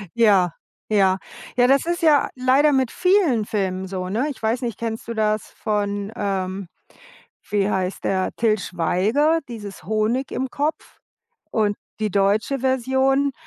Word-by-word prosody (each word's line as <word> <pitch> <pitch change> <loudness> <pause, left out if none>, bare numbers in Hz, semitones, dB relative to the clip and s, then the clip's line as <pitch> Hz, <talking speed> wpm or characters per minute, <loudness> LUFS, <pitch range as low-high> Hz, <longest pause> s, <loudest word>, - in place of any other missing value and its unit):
Ja, 200 -6 +4 0.4
ja. 195 -3 +3 0.4
Ja, 245 0 +5
das 275 +2 +3
ist 345 +1 -1
ja 305 -4 +4
leider 265 +4 +4
mit 265 -3 +1
vielen 360 - +2
Filmen 190 -3 -2
so, 185 -1 -4
ne? 230 +9 0
Ich 280 - -8
weiß 225 +3 0
nicht, 235 -5 -3
kennst 225 -1 -4
du 235 - -3
das 215 -1 0
von, 205 -1 -2
ähm, 195 -3 -2 0.8
wie 205 -1 +1
heißt 190 -1 -2
der, 190 -1 0
Til 220 -2 +2
Schweiger, 215 - +1
dieses 210 -5 -8
Honig 220 +5 0
im 260 0 -2
Kopf 295 +4 -3 0.5
und 210 -2 +1 0.2
die 215 -1 0
deutsche 205 +7 +1
Version? 265 +2 +1
220 Hz, 145 wpm, -22 LUFS, 200-265 Hz, 0.8 s, Ja